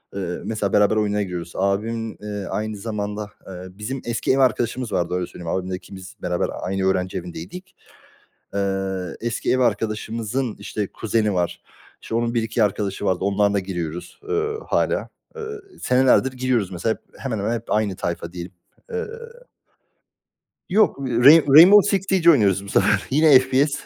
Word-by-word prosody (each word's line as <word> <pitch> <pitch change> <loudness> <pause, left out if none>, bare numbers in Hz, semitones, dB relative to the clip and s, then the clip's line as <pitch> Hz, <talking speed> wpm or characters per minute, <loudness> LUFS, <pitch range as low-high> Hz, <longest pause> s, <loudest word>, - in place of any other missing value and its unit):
eee, 100 - -3 0.2
mesela 105 -3 -2
beraber 105 +1 +4
oyunlara 105 -1 +1
giriyoruz. 85 -2 -6
Abim, 110 +3 -1
eee, 105 -2 -5
aynı 110 0 -3
zamanda 105 0 -4 0.2
Eee, 95 - -8 0.2
bizim 125 +5 -4
eski 120 0 -1
ev - - +1
arkadaşımız 125 -1 +1
vardı, 85 0 -1
öyle 90 -1 -2
söyleyeyim. 85 -2 -5
Abimle 95 0 -3
ikimiz 95 +1 -11
beraber 90 0 -1
aynı 95 +1 -2
öğrenci 95 -1 0
evindeydik. 90 - -8 0.8
Eee, 95 -2 -2
eski 120 0 -1
ev 130 - +1
arkadaşımızın, 115 +1 -1
işte, 100 0 -4
kuzeni 105 -1 -1
var. 90 -1 -1 0.4
İşte, 115 - -5
onun 120 0 0
1-2 115 0 +1
arkadaşı 100 0 -1
vardı. 95 -2 +1
Onlarla 100 +1 +2
da 100 - +2
giriyoruz, 90 -3 -6
eee, 430 +1 0
hâlâ. - - 0 0.3
Eee, 455 - -7 0.4
senelerdir 130 +1 +3
giriyoruz 125 -6 0
mesela 95 +5 -1
hep - - -23 0.2
hemen 125 -5 -3
hemen 105 +4 -1
hep 115 0 -7
aynı 105 -3 +1
tayfa 85 -2 -4
diyelim. 90 0 -7 0.4
Eee. - - -4 1.7
Yok, 205 -6 +3
Rai 135 +4 +6
Rainbow 175 +9 +9
Six 195 -2 0
Siege 180 -3 +4
oynuyoruz 100 - +2
bu - - -9
sefer. - - +2
Yine 150 -1 +6
FPS. 130 +3 +1
105 Hz, 155 wpm, -22 LUFS, 95-125 Hz, 1.7 s, Rainbow